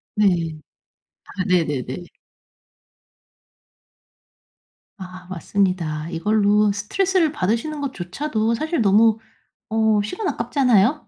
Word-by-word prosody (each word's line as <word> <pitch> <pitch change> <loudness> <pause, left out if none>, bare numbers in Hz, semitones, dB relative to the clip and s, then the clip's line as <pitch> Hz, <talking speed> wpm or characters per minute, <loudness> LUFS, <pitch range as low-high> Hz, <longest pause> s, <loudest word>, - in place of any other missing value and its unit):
네. 210 - +3 1.0
아 190 -2 -5
네네네. 155 -4 -1 3.0
아 185 -1 -10
맞습니다 175 -4 -1
이걸로 210 +4 +2
스트레스를 345 - +1
받으시는 235 +7 -2
것 280 -2 -3
조차도 220 +5 -2
사실 310 +3 -1
너무 215 +2 +4 0.5
어 220 -1 +2
시간 365 - -3
아깝잖아요? 255 0 +2
210 Hz, 205 characters per minute, -21 LUFS, 185-250 Hz, 3.0 s, 너무